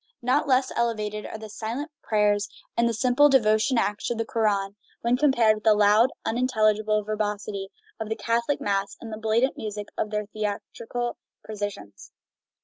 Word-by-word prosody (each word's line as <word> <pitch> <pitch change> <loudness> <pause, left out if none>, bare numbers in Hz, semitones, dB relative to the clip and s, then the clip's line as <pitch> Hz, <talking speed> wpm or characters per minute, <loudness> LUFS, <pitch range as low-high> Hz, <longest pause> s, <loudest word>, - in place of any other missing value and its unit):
Not 260 +5 +2
less 260 -1 +2
elevated 215 -3 -1
are - - -6
the 220 0 -9
silent 230 +8 -5
prayers 210 -1 +1 0.3
and 235 0 +3
the - - -1
simple 255 +5 +4
devotional 230 -1 +3
acts 205 0 -3
of 240 - -2
the 225 - -1
Koran 205 -3 0 0.3
when 235 +1 +2
compared 250 -6 +4
with 215 - -11
the 220 -1 +5
loud, 210 +4 +5 0.2
unintelligible 215 -3 +1
verbosity 205 -2 -3 0.3
of 220 -1 -4
the 220 - -1
Catholic 235 +5 0
Mass 200 0 -1
and 225 -2 -8
the 215 - -6
blatant 225 +4 +1
music 210 -1 -5
of 215 - 0
their 210 0 -2
theatrical 215 +3 -4 0.3
processions. 200 - -7
220 Hz, 160 wpm, -25 LUFS, 210-235 Hz, 0.3 s, the